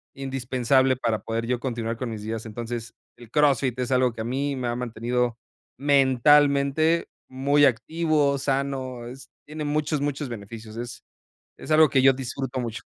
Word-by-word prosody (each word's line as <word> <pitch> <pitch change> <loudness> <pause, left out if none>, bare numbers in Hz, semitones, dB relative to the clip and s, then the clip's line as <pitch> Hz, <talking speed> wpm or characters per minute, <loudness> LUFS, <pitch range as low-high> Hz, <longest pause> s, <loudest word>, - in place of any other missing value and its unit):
indispensable 130 -1 +1
para 115 -4 -1
poder 115 +2 -3
yo 125 0 -1
continuar 115 -3 -3
con 125 -1 -4
mis 105 -2 -6
días. 110 0 -4
Entonces, 115 +1 -6 0.2
el 120 -3 -14
CrossFit 135 -4 +2
es 125 +1 -2
algo 125 -1 +3
que 110 - -6
a - - -2
mí 135 +4 -2
me 125 -2 -3
ha 120 - -1
mantenido 120 0 -2 0.4
mentalmente 140 +3 +3 0.2
muy 140 +2 +3
activo, 145 +3 +1
sano, 135 -3 -2
es 130 +1 -11 0.2
tiene 150 0 -6
muchos, 150 0 -1
muchos 145 -1 -2
beneficios. 110 0 -9
Es 120 0 -7 0.5
es - - -10
algo 155 -1 +7
que 135 -2 +2
yo 135 0 +7
disfruto 130 0 -4
mucho. 115 -2 -5
130 Hz, 160 wpm, -25 LUFS, 120-140 Hz, 0.5 s, algo